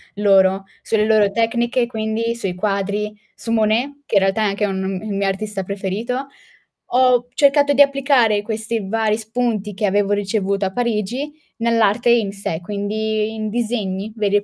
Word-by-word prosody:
loro, 195 -1 +3 0.2
sulle 215 -1 +1
loro 215 -2 +3
tecniche 235 +2 +1
quindi, 225 0 -2
sui 195 -6 -3
quadri, 200 +2 -1 0.2
su 230 - -6
Monet, 230 +6 +1
che 220 - -3
in 195 - +6
realtà 195 +3 +1
è - - +2
anche 205 +1 0
un 190 -1 -2
il 210 -2 -4
mio 200 0 0
artista 195 0 -3
preferito. 205 +8 -3 0.6
Ho 250 -1 +3
cercato 285 +1 +4
di 285 - +5
applicare 275 -7 +3
questi 220 -1 -3
vari 220 0 +1
spunti, 220 -2 -2
che 210 +2 -1
avevo 205 +1 +1
ricevuto 200 -1 0
a 190 - -2
Parigi, 240 +4 -2 0.3
nell'arte 230 0 +2
in 225 -4 +2
sé, 195 -5 -4
quindi 215 +3 -2
in 215 -1 -3
disegni 215 -3 -2
veri 205 -2 0
e 205 - -1
215 Hz, 160 wpm, -20 LUFS, 200-235 Hz, 0.6 s, in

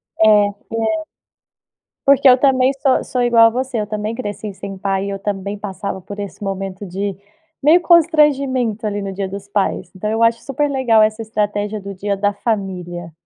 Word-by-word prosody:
É. 220 - +3
Té 205 -1 +3 1.4
Porque 280 -1 +5
eu 250 - +7
também 260 -1 +3
so 270 -1 +1
sou 250 - -2
igual 235 -1 +6
a - - +3
você, 255 0 -3
eu 210 - -4
também 215 +1 -3
cresci 210 -3 -5
sem 195 0 -8
pai 195 0 -1
e - - -3
eu 195 0 -4
também 200 0 -3
passava 200 -1 -5
por 205 +3 -9
esse 200 0 -7
momento 195 0 -4
de 195 +2 -3 0.5
meio 315 +5 +5
constrangimento, 280 - +3
ali, 205 -1 -2
no 195 0 -4
dia 195 0 -3
dos 195 +1 -8
pais, 200 -1 -1
então, 210 +3 -3
eu 225 +1 -1
acho 230 0 +3
super 290 +2 -1
legal 255 -5 +3
essa 215 +1 +1
estratégia 210 -1 -2
do 200 0 -7
dia 200 +1 -2
da 205 +1 0
família. 180 -6 -4
210 Hz, 185 wpm, -18 LUFS, 200-245 Hz, 1.4 s, eu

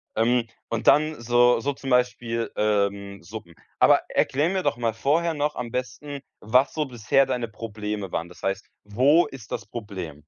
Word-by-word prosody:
Ähm, 120 +1 +2 0.2
und 115 0 -3
dann 155 -2 +4
so 120 0 +4
so 145 +4 0
zum 135 0 -7
Beispiel, 120 -2 0
ähm, 100 -2 0
Suppen. 90 -3 -9 0.3
Aber - - +6
erklär 145 +5 +1
mir 190 0 0
doch 145 -1 +1
mal 115 -2 -1
vorher 160 +8 +1
noch 150 0 -1
am 120 -2 -5
besten, 140 +3 -5 0.2
was 125 +6 +3
so 155 - 0
bisher 125 +2 +2
deine 125 -3 -2
Probleme 105 -3 -5
waren. 85 - -2
Das 90 - -16
heißt, 95 +1 -2 0.2
wo 130 +11 +4
ist 135 -6 -12
das 115 - -4
Problem? 95 -9 -7
120 Hz, 175 wpm, -25 LUFS, 105-135 Hz, 0.3 s, Aber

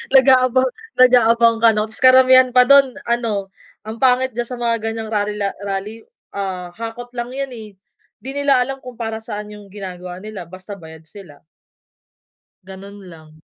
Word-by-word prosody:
Nag-aabang 260 -1 +4 0.3
nag-aabang 235 -2 +4
ka 230 - +7
'no? 210 0 0
Tapos 220 - -3
karamihan 255 0 +6
pa 250 +1 +4
dun 275 -2 +6 0.2
ano, 220 -5 -2 0.3
ang 220 +1 -8
pangit 260 +1 +2
diyan 240 - -1
sa 250 +1 -7
mga 235 -1 +1
ganyang 225 0 -4
rally 210 -1 -2 0.3
rally, 200 +2 -4 0.4
ah, 185 -3 -4
hakot 230 +2 -7
lang 240 +1 -5
yun, 275 0 -4
eh. 225 -4 -10 0.5
Di 265 - -7
nila 280 -2 +2
alam 270 +2 -3
kung 250 -2 -11
para 225 -1 -4
saan 210 -2 -7
yung 205 -2 -13
ginagawa 180 -3 -8
nila 210 -4 -8
basta 185 +4 -10
bayad 160 -2 -14
sila. 180 -8 -14 1.2
Ganun 195 +2 -12
lang. 155 -1 -16
225 Hz, 160 wpm, -19 LUFS, 200-250 Hz, 1.2 s, ka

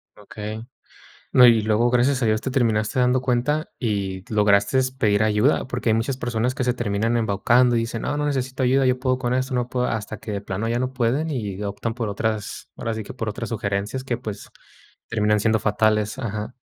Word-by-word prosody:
Okey. 105 +2 -7 0.7
No, 125 -1 +8
y 115 -2 +6
luego, 110 +3 +2
gracias 125 +2 +2
a - - +2
Dios, 110 -1 +1
te 130 - -3
terminaste 115 -1 +1
dando 125 +1 +3
cuenta 130 +5 0
y 100 -5 -2
lograste 105 +5 +3 0.2
pedir 105 -1 +3
ayuda, 110 +6 +2
porque 120 -2 -2
hay - - +4
muchas 125 +4 -1
personas 120 -1 -1
que 130 - -1
se 125 -1 +1
terminan 115 0 -1
embaucando 115 +3 +3
y - - +3
dicen: 115 0 -3
"No, 145 - -1
no 150 - -1
necesito 130 -2 -2
ayuda, 130 +1 +3
yo 125 0 +2
puedo 130 -1 +1
con 125 -1 -1
esto, 130 0 -1
yo 125 0 -1
puedo", 125 -1 0
hasta 110 -2 -3
que 110 - -7
de 100 - -3
plano 100 +2 -3
ya 120 +1 0
no 130 +1 -2
pueden, 130 +6 0
y 105 -7 -4
optan 100 +3 -3
por 115 -3 -3
otras, 110 0 -3
ahora 115 - -3
sí 110 0 -4
que - - -9
por 115 -3 -3
otras 115 +2 -5
sugerencias 105 +3 -2
que, 125 -3 -2
pues, 105 -2 -7 0.6
terminan 105 -1 +2
siendo 110 +1 +2
fatales, 110 +2 +1
ajá. 110 -2 -4
115 Hz, 210 wpm, -23 LUFS, 105-125 Hz, 0.7 s, No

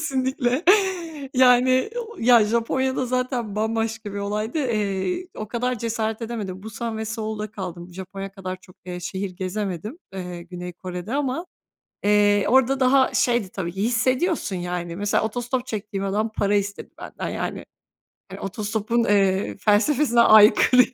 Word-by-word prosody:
Kesinlikle. 260 -1 0 0.7
Yani, 255 - +5
o, 465 -1 -7 0.3
Japonya 235 +4 0
da 255 - 0
zaten 250 -4 -2
bambaşka 225 -1 -2
bir - - -3
olaydı. 210 +7 -2
Eee, 235 - -1
o 215 -1 -5
kadar 250 +1 -1
cesaret 225 0 -2
edemedim. 205 -5 -5
Busan 220 +1 -5
ve 220 - -3
Seul'da 215 -1 -4
kaldım. 180 -4 -7
Japonya 195 +1 -7
kadar 185 -2 -5
çok, 185 0 -19
eee, 180 0 -5
şehir 190 +2 -4
gezemedim, 195 - -4
eee, 180 -2 -6
Güney 180 0 -7
Kore'de 180 +5 -6
ama, 285 +4 -1 0.6
eee, 205 -1 +4
orada 265 +2 +3
daha 260 +1 +4
şeydi. 240 -5 +2
Tabii 180 -3 -4
ki 195 +2 -3
hissediyorsun 250 - +1
yani; 175 -1 -4
mesela 205 +2 +1
otostop 245 +3 -2
çektiğim 200 -2 -4
adam 210 +3 0
para 205 0 +1
istedi 200 0 -2
benden - - -6
yani. - - -4 0.8
Otostopun, 215 +3 -1
eee, 195 -2 +2
felsefesine 235 +4 +3
aykırı 220 +3 +7
ya. 260 - -1
215 Hz, 140 wpm, -23 LUFS, 195-250 Hz, 0.8 s, aykırı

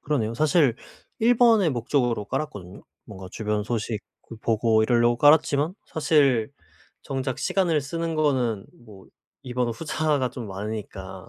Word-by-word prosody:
그러네요. 115 -7 -1
사실 150 -1 +3 0.4
1 235 +2 +3
번의 225 -8 +5
목적으로 120 -2 0
깔았거든요. 100 - -6 0.2
뭔가 95 -4 -10
주변 105 0 -2
소식 110 -1 -3 0.2
그 115 - -11
보고 110 0 +1
이러려고 120 +1 +3
깔았지만 145 +3 +3
사실 140 -8 +2 0.5
정작 130 -2 -3
시간을 175 -6 +1
쓰는 165 +4 -4
거는 130 -9 0 0.2
뭐 100 -4 -15 0.4
2 125 -1 -7
번 125 -1 0
후자가 150 0 -1
좀 120 -3 -7
많으니까 105 +2 -7
125 Hz, 295 characters per minute, -24 LUFS, 110-150 Hz, 0.5 s, 번의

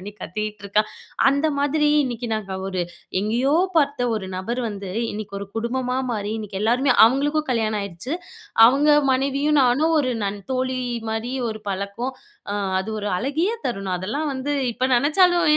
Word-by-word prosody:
பண்ணி 205 +2 -8
கத்திகிட்ருக்கான். 210 +1 -2 0.4
அந்த 280 +3 +1
மாதிரி 295 +1 +2 0.2
இன்னைக்கு 240 -1 -4
நாங்க 200 -3 -4 0.2
ஒரு 185 -2 -2 0.4
எங்கேயோ 235 +7 +1 0.2
பார்த்த 285 -5 +2
ஒரு 210 -3 -3
நபர் 235 +7 -3
வந்து 200 -2 -6 0.2
இன்னைக்கு 205 -1 -6
ஒரு 200 - -5
குடும்பமா 250 +2 -1
மாறி 210 -1 -2
இன்னைக்கு 205 -2 -5
எல்லாருமே 250 +4 +3
அவங்களுக்கும் 290 +4 0
கல்யாணம் 220 -3 0
ஆயிருச்சு. 200 - -5 0.5
அவங்க 280 +5 +3 0.2
மனைவியும் 280 +2 +2
நானும் 295 +7 +3
ஒரு 255 -3 0
நன் 200 +1 -3
தோழி 255 0 -1 0.3
மாரி 230 +4 -3 0.2
ஒரு 215 0 -7
பழக்கம். 200 +7 -3 0.4
அ 205 - -1 0.3
அது 210 - -5
ஒரு 205 - -2
அழகிய 300 - 0 0.2
தருணம். 195 -5 -2
அதெல்லாம் 285 - -2
வந்து 285 +3 -2 0.2
இப்ப 255 +3 0
நெனைச்சாலும். 345 +6 +4
245 Hz, 150 wpm, -23 LUFS, 210-280 Hz, 0.5 s, நெனைச்சாலும்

